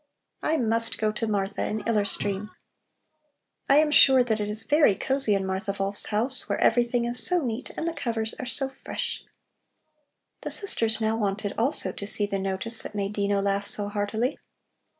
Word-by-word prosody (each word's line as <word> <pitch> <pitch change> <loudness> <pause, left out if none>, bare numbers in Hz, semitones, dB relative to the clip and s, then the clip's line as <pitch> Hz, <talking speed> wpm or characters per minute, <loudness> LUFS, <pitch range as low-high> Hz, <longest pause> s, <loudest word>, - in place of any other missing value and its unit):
"I 315 +1 +1
must 230 -2 0
go 215 -1 0
to 225 +1 -3
Martha 200 -1 -1
in 215 0 -3
Iller 215 -3 +2
Stream. 200 +1 -2 1.2
I 275 - +6
am 300 0 +4
sure 265 -3 +7
that 220 -3 -1
it 210 0 -2
is 215 +1 -5
very 295 -9 +4
cosy 265 -2 0
in 195 -1 -1
Martha 190 +2 -3
Wolf's 195 +1 0
house, 240 +5 +3
where - - -1
everything 240 +1 +2
is 240 +1 -1
so 355 -5 +2
neat 235 +1 -4
and 325 - -2
the 335 - -1
covers 230 -7 -2
are 255 - -5
so 270 +2 -2
fresh." 470 -1 -4 1.2
The - - -4
sisters 225 - 0
now 220 0 +1
wanted 205 -1 -2
also 230 -5 +1
to 200 - -7
see 205 0 +2
the 200 -1 -3
notice 195 +4 -2
that - - -8
made 200 0 -2
Dino 200 -1 0
laugh 200 0 0
so 205 0 -1
heartily. 215 +5 -2
220 Hz, 185 wpm, -26 LUFS, 200-245 Hz, 1.2 s, sure